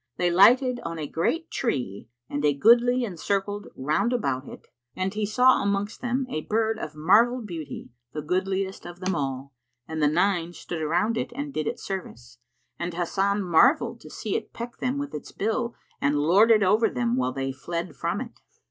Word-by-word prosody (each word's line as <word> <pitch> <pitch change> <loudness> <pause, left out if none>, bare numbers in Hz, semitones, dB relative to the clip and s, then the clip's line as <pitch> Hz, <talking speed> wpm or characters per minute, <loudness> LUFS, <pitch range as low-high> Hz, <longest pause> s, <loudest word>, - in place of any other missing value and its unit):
They 175 -1 +2
lighted 245 +7 +5
on 165 -5 -5
a 155 - -3
great 315 - -1
tree 125 - -2 0.2
and 145 +1 -3
a 145 -1 +3
goodly 240 - +5
and 180 -7 -7
circled 205 +2 -2
round 155 - 0
about 135 - -1
it; - - -11 0.3
and 185 +1 -2
he 210 -1 -1
saw 250 +4 +4
amongst 200 +1 -1
them 250 +2 -1
a 155 - -3
bird 220 +4 0
of 155 0 -6
marvel 225 +11 +4
beauty, 160 -10 -7 0.2
the 150 +1 -5
goodliest 190 +3 -2
of 175 0 -10
them 185 +1 -1
all, 135 -2 -3 0.3
and 160 0 -4
the 150 - +5
nine 175 +1 +1
stood 170 -1 -6
around 175 +9 +1
it - - -2
and 285 +1 -4
did 155 - -2
it - - -3
service; 125 - -7 0.4
and 170 0 -3
Hasan 195 +3 0
marvelled 180 - +3
to - - -12
see - - -4
it - - -4
peck 235 +1 -7
them 255 +2 -1
with 285 0 -4
its 150 - -7
bill 235 +3 -2 0.3
and 145 +1 +2
lord 180 +10 +5
it 215 -3 +6
over 210 +4 +4
them 120 -1 0
while 130 0 0
they 135 +1 -3
fled 170 +5 -5
from - - -2
it. - - -9
185 Hz, 190 wpm, -26 LUFS, 150-225 Hz, 0.4 s, it